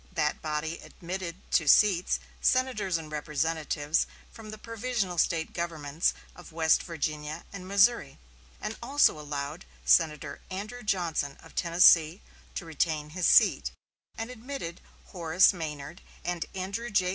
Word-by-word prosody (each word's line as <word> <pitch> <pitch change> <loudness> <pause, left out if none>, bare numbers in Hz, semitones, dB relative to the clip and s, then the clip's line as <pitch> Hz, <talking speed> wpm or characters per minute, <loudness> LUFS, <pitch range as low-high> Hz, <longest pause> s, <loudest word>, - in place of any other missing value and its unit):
That 150 - 0
body 155 +1 -3
admitted 175 -1 -6 0.2
to 160 - +3
seats 185 +2 +4 0.2
senators 250 -9 +1
and 155 -2 -9
representatives 150 0 -1 0.2
from 220 -1 -11
the 215 - -7
provisional 225 -5 -3
State 160 0 +1
governments 160 -2 -1 0.2
of 175 - -13
West 160 0 +3
Virginia 155 -1 -4
and 185 -2 -8
Missouri; 200 - +3 0.4
and 215 +1 -4
also 270 - +3
allowed 145 +3 -5 0.2
Senator 155 -4 +2
Andrew 210 +6 -6
Johnson 170 -9 -1
of 165 - -15
Tennessee 170 0 +5 0.4
to 175 - -4
retain 155 -1 -1
his 180 +2 0
seat, - - +5 0.5
and 225 +2 -4
admitted 240 -8 -7 0.3
Horace 175 +2 +4
Maynard 155 -1 -6 0.2
and 175 -1 -2
Andrew 200 +5 -4
J. 190 -3 +2
170 Hz, 130 wpm, -28 LUFS, 155-200 Hz, 0.5 s, Tennessee